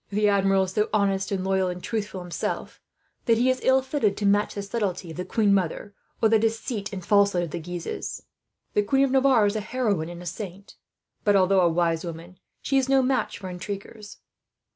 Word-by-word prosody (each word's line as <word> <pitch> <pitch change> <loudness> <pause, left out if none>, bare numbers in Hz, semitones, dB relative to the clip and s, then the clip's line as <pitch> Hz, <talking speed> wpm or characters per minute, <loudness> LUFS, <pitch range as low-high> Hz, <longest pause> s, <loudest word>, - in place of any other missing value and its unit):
"The 210 +1 +1
Admiral 195 -1 +3
is 185 - -4
so 210 +2 0
honest 195 -2 +1
and 190 -2 -1
loyal 190 -1 +1
and 180 0 -6
truthful, 205 -4 -3
himself, 175 -1 -4 0.4
that 230 -1 +4
he 250 +2 +3
is 255 - -2
ill 260 0 +3
fitted 260 -7 0
to 205 - -2
match 205 +1 +2
the 200 - -4
subtlety 195 -5 -3
of 160 - -10
the 180 - -2
queen 210 -3 +2
mother, 195 +2 -1 0.3
or - - +7
the 220 0 +4
deceit 225 -1 -2
and 185 -3 -6
falsehood 200 -3 +3
of 165 - -5
the 175 - -4
Guises. 175 +1 -5 0.5
The 210 - +3
Queen 270 +7 +2
of 265 - -2
Navarre 260 -4 +4
is 205 +1 0
a - - 0
heroine 210 -8 -1
and 175 0 -8
a - - -11
saint 195 +2 -7 0.5
but, 205 -1 +3
although 190 0 +4
a 175 - +4
wise 165 -1 0
woman, 170 +1 -8 0.2
she 275 0 +2
is 265 0 -1
no 270 -1 +4
match 260 +1 0
for 190 - -8
intriguers. 200 +3 -7
200 Hz, 210 wpm, -25 LUFS, 180-220 Hz, 0.5 s, or